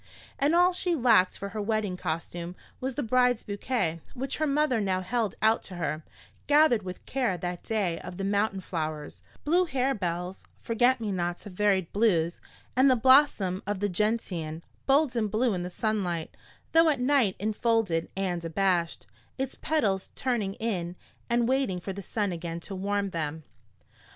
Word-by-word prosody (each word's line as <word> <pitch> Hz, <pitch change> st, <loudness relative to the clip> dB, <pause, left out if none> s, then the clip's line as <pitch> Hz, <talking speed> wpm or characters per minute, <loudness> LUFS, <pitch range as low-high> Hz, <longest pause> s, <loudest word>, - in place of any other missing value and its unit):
And 290 Hz, +4 st, +3 dB
all 355 Hz, +1 st, +5 dB
she 355 Hz, -1 st, 0 dB
lacked 225 Hz, -, +4 dB
for 200 Hz, -, -5 dB
her 210 Hz, +2 st, -4 dB
wedding 210 Hz, -3 st, -1 dB
costume 170 Hz, +1 st, -4 dB, 0.2 s
was 260 Hz, 0 st, -3 dB
the 290 Hz, -, -1 dB
bride's 250 Hz, 0 st, +2 dB
bouquet, 200 Hz, -5 st, -2 dB
which 265 Hz, +2 st, -3 dB
her 310 Hz, -, +1 dB
mother 280 Hz, -5 st, +2 dB
now 190 Hz, -2 st, 0 dB
held 225 Hz, +2 st, -1 dB
out 220 Hz, +1 st, +4 dB
to 185 Hz, -, -8 dB
her, 155 Hz, -2 st, -3 dB, 0.4 s
gathered 290 Hz, -6 st, +5 dB
with 185 Hz, -1 st, -8 dB
care 245 Hz, -9 st, 0 dB
that 175 Hz, +1 st, -4 dB
day 200 Hz, -7 st, -1 dB
of 180 Hz, 0 st, -8 dB
the 195 Hz, -, -3 dB
mountain 200 Hz, 0 st, 0 dB
flowers 155 Hz, -4 st, -4 dB, 0.2 s
blue 350 Hz, +4 st, +3 dB
harebells, 190 Hz, -, -2 dB, 0.2 s
forget 245 Hz, +3 st, +2 dB
me 215 Hz, -2 st, -2 dB
nots 175 Hz, 0 st, -2 dB
of 205 Hz, -, -9 dB
varied 190 Hz, -3 st, +1 dB
blues 175 Hz, -6 st, +2 dB, 0.3 s
and 260 Hz, +2 st, +5 dB
the 255 Hz, -, +5 dB
blossom 240 Hz, -7 st, +4 dB
of 205 Hz, -2 st, -1 dB
the 205 Hz, +1 st, 0 dB
gentian, 180 Hz, -6 st, -2 dB, 0.2 s
bold 275 Hz, -1 st, +3 dB
and 220 Hz, -3 st, 0 dB
blue 220 Hz, +2 st, +1 dB
in 180 Hz, -, -2 dB
the 180 Hz, -, -4 dB
sunlight, 180 Hz, -5 st, -2 dB, 0.4 s
though 325 Hz, 0 st, +6 dB
at 285 Hz, -4 st, +1 dB
night 250 Hz, -6 st, +3 dB
infolded 215 Hz, -5 st, 0 dB
and 180 Hz, -3 st, -1 dB
abashed, 170 Hz, 0 st, 0 dB, 0.3 s
its 265 Hz, 0 st, -2 dB
petals 205 Hz, -12 st, 0 dB
turning 225 Hz, -7 st, -1 dB
in 180 Hz, -6 st, -3 dB, 0.3 s
and 235 Hz, 0 st, +2 dB
waiting 260 Hz, -8 st, +1 dB
for 195 Hz, +2 st, -5 dB
the 200 Hz, -, -6 dB
sun 205 Hz, +1 st, -2 dB
again 170 Hz, -1 st, -4 dB
to 195 Hz, -, -8 dB
warm 200 Hz, +1 st, -1 dB
them. 160 Hz, -1 st, -3 dB
205 Hz, 170 wpm, -28 LUFS, 180-250 Hz, 0.4 s, though